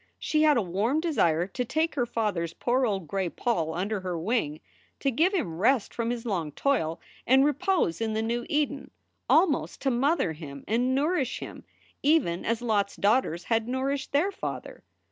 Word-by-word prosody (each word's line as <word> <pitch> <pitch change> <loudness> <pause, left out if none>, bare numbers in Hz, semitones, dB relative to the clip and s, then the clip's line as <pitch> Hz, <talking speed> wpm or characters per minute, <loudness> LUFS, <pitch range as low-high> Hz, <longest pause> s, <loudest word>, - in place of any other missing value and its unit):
She 305 - 0
had 305 -3 +5
a 230 - +2
warm 205 - 0
desire 175 - +2
to 225 +7 -3
take 315 +7 0
her 245 -4 0
father 215 -7 -1
s 170 0 -4
poor 250 +5 +1
old 195 -6 -2
gray 190 +1 -1
poll 165 -7 -1
under 200 +4 -1
her 180 -2 -3
wing, 165 -5 -1 0.4
to 275 - +1
give 325 +10 +3
him 225 - -2
rest 230 +2 +2
from 230 -1 -2
his 240 0 -3
long 170 -9 -2
toil 195 - 0 0.3
and 265 +2 +6
repose 295 - +1
in 220 -1 -1
the 220 +1 0
new 235 +1 -1
Eden, 290 -1 -1 0.4
almost 315 -8 +3
to 270 - +2
mother 270 - +1
him 145 -3 -9
and 245 +4 +1
nourish 290 -2 0
him - - -9 0.4
even 280 - +2
as 230 +1 -1
Lot 210 -4 +2
s - - -14
daughters 205 -5 +1
had 225 -1 0
nourished 265 +2 -2
their 325 +8 +2
father. - - -6
235 Hz, 185 wpm, -27 LUFS, 185-275 Hz, 0.4 s, and